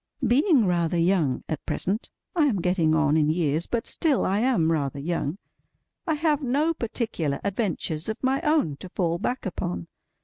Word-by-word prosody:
BEING 275 - +4
rather 175 -2 +1
young 165 -6 +2
at 155 - -4
present—I 260 - -1
am 215 -9 +1
getting 170 -3 +2
on 155 -2 +3
in 155 -1 +3
years, 160 0 0
but 235 -2 -2
still 300 -5 +1
I 195 +2 +1
am 220 -10 +2
rather 140 -4 -1
young—I 170 - -5
have 305 -1 +1
no 290 +5 +1
particular 215 - -2
adventures 190 -5 -2
of 220 - -2
my 265 +2 +1
own 300 - +1
to 185 - -9
fall 170 -2 -1
back 250 +7 -2
upon. 90 - -3
185 Hz, 160 wpm, -25 LUFS, 160-255 Hz, -, BEING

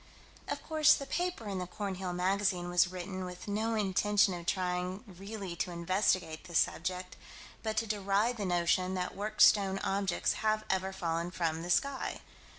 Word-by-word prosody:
Of 285 0 -4
course 310 -1 +5
the 275 - -5
paper 345 -5 -2
in 195 -2 -2
the 180 - -4
Cornhill 190 -1 -4
Magazine 180 0 0
was 175 +1 +5
written 185 +1 -5
with 180 +1 -8
no 220 +2 0
intention 205 0 +3
of 175 -1 -7
trying 180 0 -1
really 195 -1 -7
to 180 - -1
investigate 175 -1 0
this 170 -3 -1
subject, 180 +1 -1 0.4
but 220 -1 -3
to 225 - +2
deride 210 +3 +1
the 205 - -2
notion 180 +1 +1
that 180 -1 -3
worked 210 +2 +2
stone 195 -2 +5
objects 195 -2 +1
have 215 0 +1
ever 190 0 0
fallen 170 -2 -2
from 165 -2 -1
the 175 - -6
sky. 275 +9 0
190 Hz, 165 wpm, -32 LUFS, 180-210 Hz, 0.4 s, course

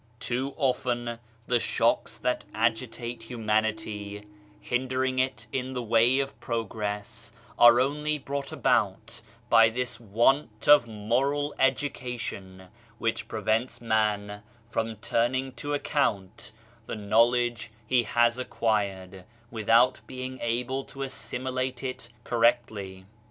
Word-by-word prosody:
Too 130 +3 -2
often 120 -4 -1 0.3
the 120 0 +2
shocks - - +1
that 125 - -1
agitate 115 +1 -1
humanity, 110 -2 -2 0.3
hindering 130 +3 -1
it 130 -3 -1
in 130 0 -3
the 125 -1 -3
way 115 +3 +4
of 135 0 -2
progress, 110 -1 -4 0.3
are 120 0 +8
only 150 +3 0
brought 140 0 -5
about 115 -3 0 0.3
by 115 -1 +6
this 120 0 -3
want 115 +1 +1
of 145 -5 +7
moral 130 +7 0
education 120 -9 -2 0.3
which 115 0 -2
prevents 115 +3 -1
man 105 -2 0 0.3
from 115 -1 -1
turning 125 +5 0
to 145 +2 -3
account 110 -10 -1 0.4
the - - -4
knowledge 115 +3 +2 0.2
he 125 +2 +3
has 120 +2 +2
acquired 100 -6 -2 0.3
without 115 +3 +3
being 130 0 -6
able 125 +3 -1
to 135 0 -7
assimilate 130 0 -4
it 130 -3 -5
correctly. 110 -5 0
120 Hz, 110 wpm, -27 LUFS, 110-130 Hz, 0.4 s, are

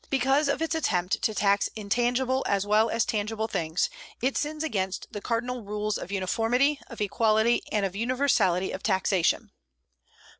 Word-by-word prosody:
Because 275 +2 +2
of 280 +3 0
its 325 - -1
attempt 185 - 0
to 220 - 0
tax 200 -1 +2
intangible 245 +5 0
as 200 0 +1
well 215 +2 +3
as 230 0 +1
tangible 220 -1 -2
things, 165 -5 -1 0.3
it 260 +3 0
sins 305 +1 -2
against 190 -10 -2
the 205 - -6
cardinal 245 +1 -2
rules 210 +1 -2
of 185 - -7
uniformity, 230 +9 +1
of - - -9
equality, 220 +3 +2
and 205 -2 +1
of 195 -1 -4
universality 230 -6 +1
of - - -5
taxation. 190 -3 +1
220 Hz, 155 wpm, -27 LUFS, 200-250 Hz, 0.3 s, well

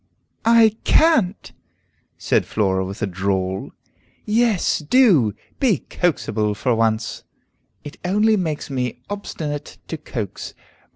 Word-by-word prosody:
"I 225 -2 +5
can't!" 275 - +3 0.7
said - - +1
Flora 95 -3 0
with 95 +4 -6
a - - +3
drawl. 95 0 -2 0.6
"Yes, 220 -3 +2
do! 155 - +4 0.2
Be 250 -7 +2
coaxable, 110 - 0
for 125 +4 0
once!" 115 0 0 0.6
"It 145 - -10
only 210 +4 +3
makes 160 -7 -3
me 125 -2 -3
obstinate 150 -7 -5
to 160 - -3
coax. 110 -9 -6
145 Hz, 110 wpm, -21 LUFS, -, 0.7 s, I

